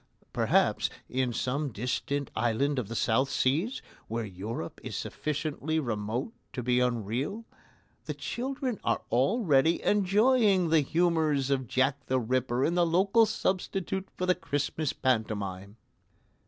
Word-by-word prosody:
Perhaps, - - +2 0.2
in 130 -1 0
some 135 +5 -1
distant 130 +5 -2
island 120 +5 +1
of 115 - -4
the 115 - -6
South 130 +5 +2
Seas, 160 - 0 0.2
where 115 0 -2
Europe 95 -1 -6
is - - -5
sufficiently 155 +1 -2
remote 115 - -3 0.2
to 125 - -4
be 125 +1 +2
unreal, 125 - -1 0.6
the - - -4
children 260 -2 -3
are 115 - 0
already 155 - +3
enjoying 205 -2 +3
the 160 -2 +5
humours 155 -3 +1
of 130 -2 0
Jack 130 +3 0
the 130 0 +2
Ripper 125 +1 0
in 170 - +1
the 175 0 +3
local 195 +7 +4
substitute 190 -2 -2
for 180 - -1
the 180 - +4
Christmas 150 -3 -2
pantomime. 105 -5 -2
140 Hz, 130 wpm, -29 LUFS, 120-180 Hz, 0.6 s, the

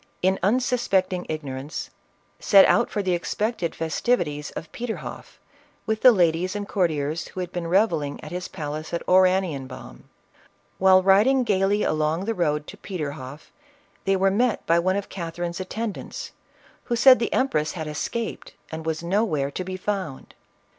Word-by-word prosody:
in 190 +1 +2
unsuspecting 195 -4 +1
ignorance, 145 -1 -5 0.5
set 195 -2 +7
out - - +3
for 205 - -2
the 185 -1 +1
:ed 180 +1 -2
festivities 160 -3 -1
of 160 - -7
Peterhoff, 240 -2 -6 0.5
with 220 0 -1
the 255 - +9
ladies 180 -1 +1
and 205 -1 -4
courtiers 160 -5 -1
who - - -8
had 180 -1 -4
been 175 -2 -4
revelling 165 -6 +1
at 150 - -8
his 180 +1 -4
palace 155 -1 -6
of 170 - -2
Ora 185 0 +5
nienbaum. 135 - -7 0.8
While 185 0 +6
riding 215 +8 +5
gaily 200 -1 +1
along 155 +4 0
the 225 - 0
road 150 -6 0
to - - -10
Pe 190 - -7
terhofl", 140 -2 -6 0.6
they 195 - +3
were 195 0 +2
met 235 +2 +1
by 170 +1 +3
one 185 +2 +1
of 200 0 -3
Catherine's 170 0 -5
attendants, 225 - -5 0.5
who 240 - -1
said 255 +2 +7
the 235 - -1
empress 155 - +1
had 160 -3 -5
escaped 215 +9 -4 0.2
and 160 0 -6
was 160 +1 -2
nowhere 170 -7 0
to 185 - -4
be 185 +1 -5
found. 185 -8 -4
185 Hz, 160 wpm, -24 LUFS, 160-205 Hz, 0.8 s, the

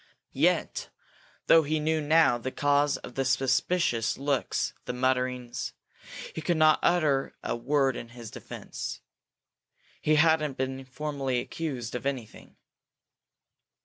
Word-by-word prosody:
Yet, - - +1 0.6
though 165 - +7
he 155 +1 -1
knew 155 +1 +1
now 150 -5 +4
the 130 - -3
cause 145 0 +2
of - - -10
the 135 - 0
suspicious 130 0 +1
looks, 140 -1 -1
the 125 - -3
mutterings, 125 -1 -1 0.6
he 160 - -5
couldn't 160 0 +2 0.2
utter 150 -6 +2
a - - -1
word 135 +2 +1
in 115 - -7
his 120 -2 -10
defence. - - -7 1.0
He 155 - +3
hadn't 150 -2 +3
been 130 0 -3
formally 135 -2 -2
accused 125 -3 -4
of 125 +2 -3
anything. 130 -6 -6
135 Hz, 120 wpm, -28 LUFS, 125-155 Hz, 1.0 s, though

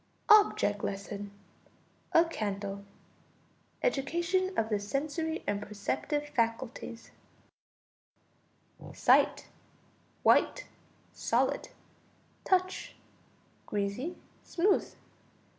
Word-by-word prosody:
] - - -39
OBJECT 205 - -1
LESSON 200 +1 -4 0.8
A 330 +1 +7
Candle: 200 -8 -4 1.0
Education 345 - +1
of 220 - +1
the 210 -2 +1
sensory 305 +9 -2
and 205 0 -1
perceptive 215 +8 -2
faculties. 230 -1 -2 1.8
Sight. - - +4 0.8
White, - - +4 0.5
solid. - - 0 0.7
Touch. 370 0 0 0.7
Greasy, 210 - -2 0.3
smooth. 385 +3 +1
255 Hz, 70 wpm, -31 LUFS, 205-335 Hz, 1.8 s, A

